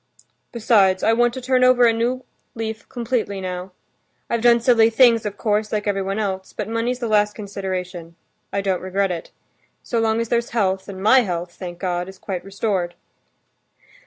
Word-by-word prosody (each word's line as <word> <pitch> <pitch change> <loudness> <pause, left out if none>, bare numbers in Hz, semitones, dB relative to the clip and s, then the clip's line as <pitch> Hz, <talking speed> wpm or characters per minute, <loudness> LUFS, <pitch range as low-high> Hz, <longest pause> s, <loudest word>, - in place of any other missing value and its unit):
"Besides, 205 -5 +3
I 225 - +4
want 240 +1 +3
to 260 - -5
turn 255 0 +2
over 255 -1 +6
a 230 - +5
new 245 +3 -1 0.3
leaf 220 -1 -5
completely 235 -5 -2
now. 185 0 -5 0.6
I've 235 - 0
done 235 0 +5
silly 230 -2 +4
things, 230 -2 +4
of 205 0 -6
course, 215 -1 0
like 210 -1 -1
everyone 195 -1 -1
else, 190 -3 -3
but - - -4
money's 230 +2 -1
the 240 -2 -3
last 210 -1 +2
consideration; 185 -4 -5 0.4
I 200 - -1
don't 190 -2 -1
regret 190 +1 0
it. 170 -2 -5 0.5
So 235 - -1
long 225 0 +1
as 230 -1 -2
there's 235 0 0
health, 190 -2 0
and 190 -1 -7
my 255 +5 +6
health, 175 -6 -2
thank 175 -2 -8
God, 180 0 -2
is 190 - -12
quite 185 -2 -5
restored." 195 -3 -2
210 Hz, 180 wpm, -21 LUFS, 190-230 Hz, 0.6 s, over